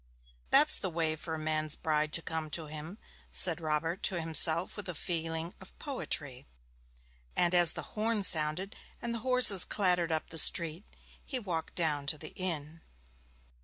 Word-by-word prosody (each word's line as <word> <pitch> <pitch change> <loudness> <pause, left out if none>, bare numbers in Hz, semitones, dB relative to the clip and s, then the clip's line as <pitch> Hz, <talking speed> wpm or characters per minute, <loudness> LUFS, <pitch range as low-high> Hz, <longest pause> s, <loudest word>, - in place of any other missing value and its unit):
'That's - - +3
the 190 - -4
way 160 -2 -3
for 160 +1 -8
a - - -8
man's 155 -1 -1
bride 155 -1 -3
to 165 - +4
come 160 -1 -6
to 160 +1 -5
him,' 155 +5 -10 0.3
said 175 -1 +5
Robert 160 +4 -4
to 185 -3 -3
himself 165 +1 +4
with 205 -3 -9
a 180 - -6
feeling 165 +1 -5
of 190 - -10
poetry; 145 - -7 0.9
and 175 0 0
as 175 -2 +4
the - - -8
horn 215 -1 -3
sounded 160 +4 +2 0.2
and 235 -1 -6
the 230 - -6
horses 250 -6 +7
clattered 180 -4 -2
up 160 -1 -5
the 165 - +2
street 170 +1 +3 0.4
he 265 - -4
walked 175 -9 -7
down 150 -4 -3
to 155 - -3
the 155 +1 -8
inn. 165 -3 -5
165 Hz, 165 wpm, -28 LUFS, 155-185 Hz, 0.9 s, horses